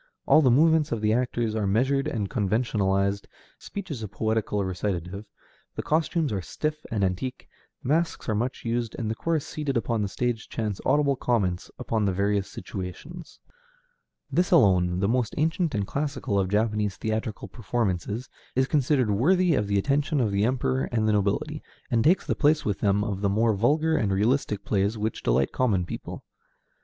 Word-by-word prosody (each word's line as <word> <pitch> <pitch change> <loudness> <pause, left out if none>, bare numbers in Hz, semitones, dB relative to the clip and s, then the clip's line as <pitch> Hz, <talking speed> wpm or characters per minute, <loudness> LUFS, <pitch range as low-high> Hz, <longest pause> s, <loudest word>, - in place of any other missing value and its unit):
All 155 - +6
the 135 - +4
movements 155 +4 +4
of 115 - -1
the 110 0 +2
actors 120 -2 0
are 110 -2 -1
measured 130 +7 +1
and 105 -4 -2
conventionalized, 100 -3 0 0.3
speech 200 -4 -7
is 130 -6 -4
a 110 - -4
poetical 105 0 -1
recitative, 95 +1 -3 0.5
the - - -3
costumes 160 - 0
are 95 - -1
stiff 155 - -4
and 105 -3 -1
antique, 95 +8 -2 0.4
masks 165 +6 0
are 110 - +1
much 120 +5 -2
used, 115 -1 -1
and 110 -3 -2
a - - 0
chorus 160 +5 -1
seated 145 -4 -2
upon 115 -1 0
the 100 - 0
stage 120 +2 -2
chants 105 -4 -3
audible 140 0 +3
comments 100 -9 -1
upon 110 -2 -1
the 100 - +2
various 100 +1 0
situations. 110 - -8 0.9
This 180 +1 +2
alone, 90 - +4
the 100 - +2
most 120 0 0
ancient 160 0 0
and 100 -1 0
classical 140 -5 -2
of 95 -1 0
Japanese 105 -1 0
theatrical 110 0 -3
performances, 110 0 -2 0.3
is 130 +1 +3
considered 135 -6 +2
worthy 175 - +3
of 105 -7 +1
the 100 0 +1
attention 140 +7 +1
of 115 -5 +1
the 100 +1 +2
Emperor 130 +1 0
and 110 -2 +1
the 110 - +3
nobility, 105 +10 0 0.3
and 115 -2 +3
takes 175 +7 +3
the - - 0
place 150 0 +2
with 105 -2 -1
them 100 0 +2
of 100 -2 -3
the 100 - +2
more 110 +3 +2
vulgar 155 +10 +2
and 105 -7 0
realistic 105 0 0
plays 100 +2 0
which 110 +1 -2
delight 65 +2 +1
common 105 -9 +1
people. - - -7
110 Hz, 175 wpm, -26 LUFS, 100-140 Hz, 0.9 s, All